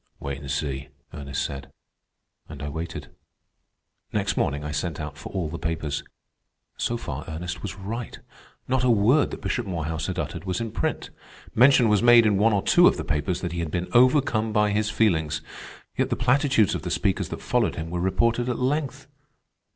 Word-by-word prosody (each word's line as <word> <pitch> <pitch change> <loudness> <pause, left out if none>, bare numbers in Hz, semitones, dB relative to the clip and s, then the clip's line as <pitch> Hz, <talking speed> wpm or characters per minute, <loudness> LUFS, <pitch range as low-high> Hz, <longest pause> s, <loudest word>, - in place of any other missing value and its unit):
"Wait 70 0 -5
and 70 -1 -9
see," 70 -1 -2 0.3
Ernest 70 -2 -3
said, 70 -1 -7 0.8
and 75 -2 -8
I 75 - -3
waited. 80 +3 -6 1.0
Next - - 0
morning 70 +1 0
I 75 - -4
sent 75 +2 -3
out 75 -2 -5
for 70 - -9
all 90 -5 -2
the 85 +2 -6
papers. 75 -3 -2 0.7
So 120 - -1
far 75 - -5
Ernest 85 +2 -5
was 100 -5 -5
right. 110 +4 -6 0.5
Not 130 0 +1
a 125 - +3
word 120 +6 +4
that - - -8
Bishop 120 -4 -2
Morehouse 80 -4 -3
had - - -3
uttered - - -4
was 95 +1 -2
in 115 -2 -3
print. - - -2 0.4
Mention 125 0 +6
was 105 -2 +3
made 120 -1 +7
in 105 -2 +3
one 115 +2 +4
or 100 -2 +1
two - - +6
of - - +3
the - - -3
papers 75 +5 -1
that 90 - -3
he 85 - -4
had 85 -2 -2
been 90 +3 -3
overcome 125 -3 +4
by 105 -1 +2
his 105 +1 0
feelings. 80 -9 +1 0.5
Yet - - 0
the - - 0
platitudes 130 - +3
of - - -3
the - - -4
speakers - - 0
that - - -5
followed - - +1
him 80 +1 -5
were 90 0 -2
reported 115 +6 +1
at 125 - -1
length. 135 +1 -1
95 Hz, 195 wpm, -25 LUFS, 75-115 Hz, 1.0 s, made